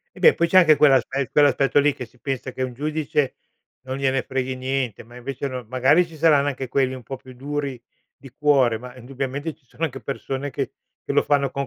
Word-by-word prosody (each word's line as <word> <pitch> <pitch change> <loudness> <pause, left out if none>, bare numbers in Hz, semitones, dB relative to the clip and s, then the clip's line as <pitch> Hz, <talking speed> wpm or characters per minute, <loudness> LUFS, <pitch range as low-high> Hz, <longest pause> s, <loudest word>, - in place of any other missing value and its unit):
Eh, - - -12
beh, 470 - +6
poi 170 - +1
c'è 185 - +6
anche 155 -4 +7
quell'aspe 135 -2 +3
quell'aspetto 145 -1 +4
lì, 145 +1 +4
che 125 - -6
si 120 +2 -21
pensa 135 -1 -4
che 130 - -5
un 125 - -4
giudice 150 -1 -1 0.5
non 130 0 -5
gliene 135 -1 +1
freghi 130 -1 -3
niente, 130 -4 -2
ma 120 +2 -17
invece 130 +3 -5
no, 130 -2 -5
magari, 130 +7 +4
ci 165 -2 -13
saranno 150 -3 +4
anche 135 -1 -3
quelli 130 0 0
un 125 - -10
po' 135 - -6
più 130 0 -14
duri 140 0 -4 0.4
di 135 - -13
cuore, 135 -6 +3
ma 125 +2 -10
indubbiamente 135 +4 -4
ci 160 - -37
sono 160 +7 -4
anche 135 -3 -4
persone 140 0 -4
che 135 -3 -3 0.3
che - - -3
lo - - +4
fanno 140 -2 +1
con 140 0 -3
135 Hz, 220 wpm, -23 LUFS, 130-145 Hz, 0.5 s, anche